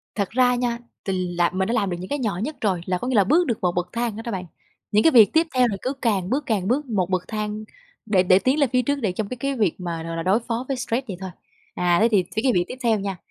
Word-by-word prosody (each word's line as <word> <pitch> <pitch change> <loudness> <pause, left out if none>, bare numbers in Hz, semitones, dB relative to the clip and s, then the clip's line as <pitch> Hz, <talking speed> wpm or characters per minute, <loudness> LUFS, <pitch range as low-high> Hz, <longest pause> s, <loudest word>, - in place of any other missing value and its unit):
thật 200 -3 -1
ra 250 0 +3
nha, 240 -1 -1 0.3
thì 185 -2 -1
là 175 -1 +3
mình 190 0 0
đã 235 - -1
làm 205 -5 +1
được 175 - -3
những 185 - -7
cái 290 - -2
nhỏ 210 -8 -1
nhất 305 +4 -4
rồi, 190 -5 0
là 180 -1 0
có 250 - -5
nghĩa 260 - 0
là 200 - +6
bước 335 - +3
được 235 - -1
một 180 -1 +2
bậc 175 0 -1
thang 235 -2 -2
đó 225 - -6
đó 235 - -3
bạn. 185 -2 -4 0.5
Những 210 +1 +4
cái 325 - +6
việc 225 -5 +7
tiếp 325 +1 +3
theo 250 -1 +4
là 200 -3 -3
cứ 260 +2 -2
càng 200 -6 0
bước 285 +3 0
càng 200 -5 -1
bước 275 +5 +1
một 195 -7 -1
bậc 185 -1 0
thang 215 0 -4 0.4
để 195 -4 +3
để 185 +1 +5
tiến 265 +7 +1
lên 280 - +3
phía 250 - +4
trước, 285 +4 0
để 200 -5 0
trong 200 +2 -3
cái 250 - -5
cái 275 +2 -2
việc 205 -8 +1
mà, 170 -2 -4
gọi 165 0 -5
là, 165 - -2
đối 195 +5 +3
phó 235 +1 -4
với 270 -2 -2
stress 245 +1 -2
vậy 185 -4 -5
thôi. 190 -1 -5 0.5
À, 175 -1 +2
thế 230 - +6
thì 195 -4 +4
với 220 - 0
cái 260 - +4
việc 175 -3 +2
tiếp 255 - -7
theo 225 -3 +2
nha, 195 -2 -4
215 Hz, 310 wpm, -23 LUFS, 185-250 Hz, 0.5 s, việc